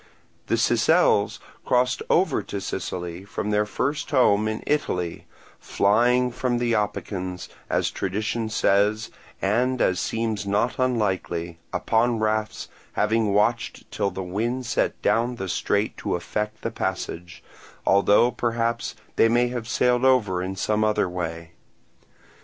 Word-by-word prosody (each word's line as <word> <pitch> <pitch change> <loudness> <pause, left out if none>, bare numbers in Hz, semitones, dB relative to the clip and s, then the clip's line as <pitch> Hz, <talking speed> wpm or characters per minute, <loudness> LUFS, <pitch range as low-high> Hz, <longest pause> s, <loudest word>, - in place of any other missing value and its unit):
The - - +1
Sicels - - +3 0.3
crossed 125 0 +1
over 185 +3 +3
to 100 - -5
Sicily 90 -2 -5
from 105 +1 -4
their 105 0 +2
first 140 +7 -2
home 110 -6 +3 0.2
Italy, 90 - -1 0.3
flying 125 +5 +2
from 125 0 -1
the 120 -1 0
Opicans, 95 -3 -3 0.2
as - - +1
tradition 110 +4 -2
says 105 0 +2 0.3
and 125 +6 +1
as 90 -1 +2
seems 110 0 -2
not 105 +6 0
unlikely, 95 -9 -1
upon 115 +1 +1
rafts, 110 0 -1 0.3
having 110 0 +1
watched 110 +4 0
till 100 - 0
the 95 0 -5
wind 115 +8 -2
set 115 - 0
down 120 +2 +2
the 95 -5 -5
strait 100 +3 0
to 100 - -2
effect 105 +5 -4
the 115 - -2
passage; 90 -4 -4 0.4
although 100 +5 +4
perhaps 115 -1 -1 0.2
they 115 - +5
may 120 +1 +3
have 120 -2 -5
sailed 125 0 +2
over 110 -9 +3
in 95 +1 -4
some 105 +2 0
other 105 -3 +2
way. 85 -2 -5
110 Hz, 130 wpm, -24 LUFS, 95-120 Hz, 0.4 s, they